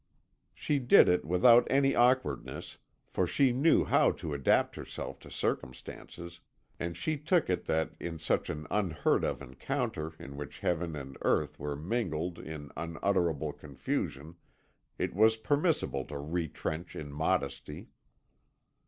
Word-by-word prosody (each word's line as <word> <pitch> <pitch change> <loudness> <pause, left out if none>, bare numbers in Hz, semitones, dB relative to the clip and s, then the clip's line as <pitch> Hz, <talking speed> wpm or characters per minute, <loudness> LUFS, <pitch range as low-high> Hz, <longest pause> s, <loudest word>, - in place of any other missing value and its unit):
She 145 -2 0
did 125 - +7
it 90 -3 +2
without 115 +9 +6
any 135 0 +3
awkwardness, 125 +2 +1 0.3
for 90 - -1
she 135 +7 +3
knew 140 +7 +4
how - - +4
to 80 - -5
adapt 70 -2 +2
herself - - -7
to - - -13
circumstances; 85 +6 -5 0.4
and 85 0 -3
she 155 -2 -1
took 160 - +2
it 90 - -1
that 80 0 0
in 85 -1 -5
such 80 - 0
an 75 0 -4
unheard 90 -8 +1
of - - -2
encounter 75 +4 -3
in 70 -1 -9
which 75 -2 -8
heaven 85 -2 -1
and 70 -2 -8
earth - - +1
were 75 -1 -3
mingled 85 -1 -2
in 75 -3 -8
unutterable 85 -1 0
confusion 80 +5 -4 0.6
it - - -2
was 110 +4 +4
permissible 145 - +1
to 75 - -6
retrench 80 +2 -4
in 75 -2 -6
modesty. 70 -2 -2
85 Hz, 135 wpm, -31 LUFS, 75-115 Hz, 0.6 s, did